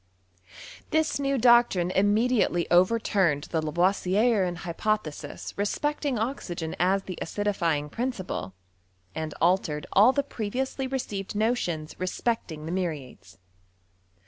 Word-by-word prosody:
This 315 -2 +1
new 275 -1 0
doctrine 235 -7 +4
immediately 205 -2 +2
overturned 185 -5 +3
the 160 - +1
Lavoisierian 185 +4 +2
hypothesis 170 -5 -3
respecting 285 +6 -1
oxygen 190 -9 -3
as 190 +3 +2
the 185 -3 -7
acidifying 170 -7 -1
prin 250 +3 -1
ci|iie, 185 - -5 0.6
and 155 +4 -4
altered 170 -4 +1
ail 215 +6 +7
the 280 +1 0
previously 260 +2 -3
received 210 -7 -4
notions 205 -9 -1
cespecting 185 -3 -2
l^e 170 - -3
muriates. 160 -9 -5
195 Hz, 105 wpm, -27 LUFS, 170-235 Hz, 0.6 s, ail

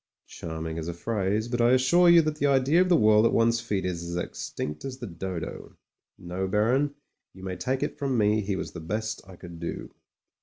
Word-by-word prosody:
"Qiarming 80 0 -6
as 80 - -5
a 85 - -4
phrase, 105 +2 -1
but 120 0 -1
I 120 +2 +5
assure 170 +8 +5
you 170 -1 +7
that 155 0 -2
the 145 - +1
idea 140 +5 +4
of 185 - +2
the 175 - +6
world 110 0 +5
at 115 - +4
one's 115 0 +3
feet 105 -5 -2
is 90 -2 -2
as 85 0 -5
extinct 75 -3 -5
as 130 -1 -5
the 120 - -7
dodo. 90 -3 -6 0.4
No, 90 +2 -4
Baron, 125 +9 +1 0.4
you 95 - -12
may 95 -1 -4
take 130 +4 -2
it - - -4
from 135 -3 0
me 105 0 +3
he 100 -1 -2
was - - -5
the 90 - -8
best 110 +7 -3
I 95 - -12
could 85 -1 -11
do. 85 - -6
110 Hz, 220 wpm, -27 LUFS, 90-130 Hz, 0.4 s, you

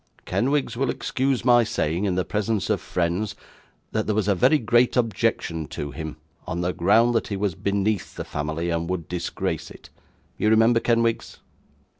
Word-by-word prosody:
'Kenwigs 135 -1 0
will 130 +1 0
excuse 130 -1 -1
my 120 -1 +6
saying, 95 -5 -1
in 95 -3 0
the 90 -1 0
presence 105 0 -1
of 105 - 0
friends, 95 +3 -1 0.6
that 110 - -1
there 105 - +1
was 105 -2 0
a 100 - +4
very 100 - +4
great 120 0 +2
objection 90 -8 0
to 75 -1 -5
him, 80 -1 -6 0.3
on 85 +2 -2
the 90 +1 -1
ground 115 +7 +4
that 115 - 0
he 100 - -3
was 100 -2 0
beneath 100 +3 -1
the - - -5
family, 80 +3 -3
and 85 0 -2
would 90 -4 -3
disgrace 90 -1 -3
it. - - -14 0.5
You 105 - +2
remember, 115 +2 +5
Kenwigs? 115 -1 0
105 Hz, 175 wpm, -24 LUFS, 85-115 Hz, 0.6 s, my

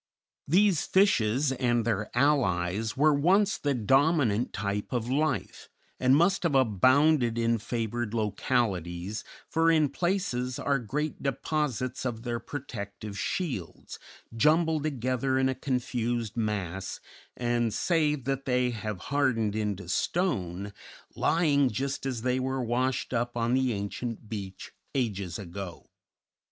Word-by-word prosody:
These 185 +1 +3
fishes 135 - +3
and 120 -3 +1
their 105 -2 -1
allies 110 -7 +1
were 150 +2 +5
once 190 +8 +3
the 145 -2 0
dominant 130 -1 +2
type 100 +1 -3
of 120 -1 -2
life, 155 +3 -1 0.3
and 130 +1 +4
must 175 +6 +3
have 170 -6 +1
abounded 130 - +4
in 115 0 +1
favored 115 0 -3
localities, 100 -4 -1 0.2
for 165 0 +2
in 155 -3 +4
places 175 -10 -1
are 140 -1 +1
great 145 +7 -3
deposits 135 -2 -2
of 120 -3 -3
their 120 -1 -2
protective 110 -6 -7
shields 100 - -4 0.4
jumbled 155 +5 +3
together 130 -1 0
in 130 0 +3
a 130 - +1
confused 120 -4 -2
mass, 95 -5 -3 0.4
and, 120 -1 0
save 150 - +1
that 135 +1 -2
they 125 -1 +1
have 110 -3 -4 0.2
hardened 115 -7 +1
into 105 -4 -2
stone, 100 - -1 0.4
lying 145 -5 +3
just 135 +4 -3
as 120 -4 -3
they 125 0 +1
were 130 0 -1
washed 125 +3 -1
up 120 0 -1
on 115 +1 +1
the 130 -1 +2
ancient 110 +2 -4
beach 100 -3 -7 0.2
ages 100 -9 -1
ago. 95 -1 -8
125 Hz, 125 wpm, -28 LUFS, 105-140 Hz, 0.4 s, were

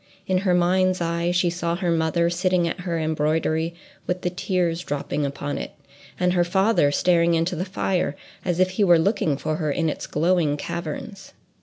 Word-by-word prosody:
In 185 -2 +1
her 185 -2 +2
mind's 185 +1 +2
eye 170 0 -1
she 175 0 +2
saw 170 -1 -2
her 175 -1 -1
mother 165 +1 +1
sitting 180 0 +1
at 170 - -4
her 175 -2 -2
embroidery 160 +1 0 0.3
with 180 0 -1
the 180 - 0
tears 180 -2 -1
dropping 145 -1 -2
upon 140 +1 -4
it, - - -6 0.5
and 180 0 +2
her 175 -1 +3
father 190 -3 +2
staring 170 +1 +3
into 165 +2 0
the 175 +3 -2
fire 185 -5 -1 0.3
as 175 -1 -1
if 185 0 +3
he 195 +3 +1
were 175 -3 +6
looking 160 -4 +1
for 155 +1 -2
her 155 -3 -1
in 160 +2 0
its - - -5
glowing 160 -2 +1
caverns. 170 +5 -6
170 Hz, 185 wpm, -23 LUFS, 160-180 Hz, 0.5 s, were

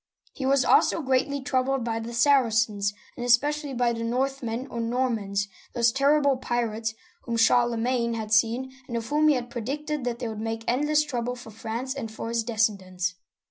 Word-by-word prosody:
He 265 - -3
was 275 -1 +3
also - - +4
greatly 270 +2 +1
troubled 260 -1 0
by 225 -1 -2
the 225 +1 -6
Saracens, 225 -6 +2 0.2
and 240 - -5
espe 245 +4 +4
cially 295 -3 -4
by 240 -1 +2
the 230 0 -4
Northmen, 250 0 -2
or 235 - -6
Normans, 230 -5 -1 0.3
those 235 -1 +4
terrible 280 +1 +3
pirates 225 -3 -2 0.3
whom 235 -1 -2
Charlemagne 235 +1 +2
had 220 -1 -3
seen, 235 +4 +2 0.2
and 235 -3 -3
of 230 - -4
whom 300 +1 +3
he 300 - +5
had 245 -1 -4
pre 240 - -4
dicted 295 +4 -3
that 240 -1 -1
they 240 - -4
would 215 -1 -5
make 225 0 -3
endless 295 +5 +2
trouble 245 -4 -3
for 240 -2 -11
France 230 +4 -4
and 255 -6 -5
for 225 +1 -6
his 230 -1 0
descendants. 195 -5 -1
240 Hz, 185 wpm, -26 LUFS, 225-265 Hz, 0.3 s, he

